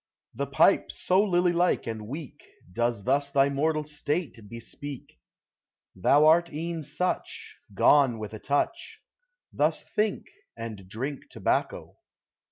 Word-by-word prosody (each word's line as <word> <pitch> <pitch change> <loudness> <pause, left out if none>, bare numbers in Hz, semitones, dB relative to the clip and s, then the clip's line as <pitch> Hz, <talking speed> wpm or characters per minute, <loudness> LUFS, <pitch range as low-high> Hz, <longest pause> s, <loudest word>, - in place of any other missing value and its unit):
The 140 +4 -3
pipe, 140 +8 +3
so 185 +2 +2
lily 180 -3 +2
like 175 +1 +1
and 110 -2 -5
weak, 145 +2 -8 0.3
Does 120 -2 -1
thus 140 +4 +1
thy 140 0 +3
mortal 155 +2 0
state 150 -1 -3
bespeak; 120 - -9 0.8
Thou 140 +11 +4
art 170 +2 +5
e'en 165 +2 -4
such, 155 +5 -4
— - - -23
Gone 135 -5 +5
with 110 0 -7
a 110 - -7
touch: 145 +4 -2 0.5
Thus - - +1
think, 210 -1 -1 0.3
and 105 -5 -7
drink 130 +7 -5
tobacco. - - -2
145 Hz, 130 wpm, -27 LUFS, 120-165 Hz, 0.8 s, art